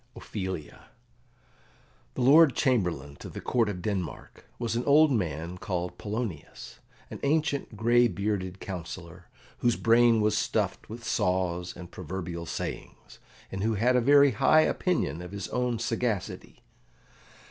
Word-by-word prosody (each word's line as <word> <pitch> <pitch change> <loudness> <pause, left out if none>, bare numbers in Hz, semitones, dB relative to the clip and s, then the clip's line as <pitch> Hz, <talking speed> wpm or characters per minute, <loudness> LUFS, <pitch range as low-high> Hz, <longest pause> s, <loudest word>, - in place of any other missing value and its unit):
Ophelia 95 -7 -6 1.3
The - - -2
Lord 145 +2 +7
Chamberlain 90 - 0
to - - -9
the - - -7
Court 115 -4 +1
of 90 -3 -5
Denmark 95 -5 -5
was 115 -1 -2
an 120 - 0
old 150 +1 +6
man 85 - -2
called 90 -2 -4
Polonius, 105 -6 -6 0.3
an - - -7
ancient 140 -5 0
gray 120 +2 +4
bearded 100 -2 -3
councillor, 90 -1 -8 0.3
whose 120 -1 +2
brain 115 0 +4
was 105 0 +2
stuffed - - -1
with 115 +2 -8
saws 90 -3 -1
and 85 -1 -10
proverbial 85 -1 -6
sayings, - - -7 0.3
and 95 - -4
who 110 +1 +1
had 125 +5 +2
a 125 - +4
very 140 +2 +6
high 155 +8 +4
opinion 170 - 0
of 90 +2 -9
his 100 -2 -4
own 125 -1 -1
sagacity. 115 -3 -3
105 Hz, 135 wpm, -28 LUFS, 90-120 Hz, 1.3 s, Lord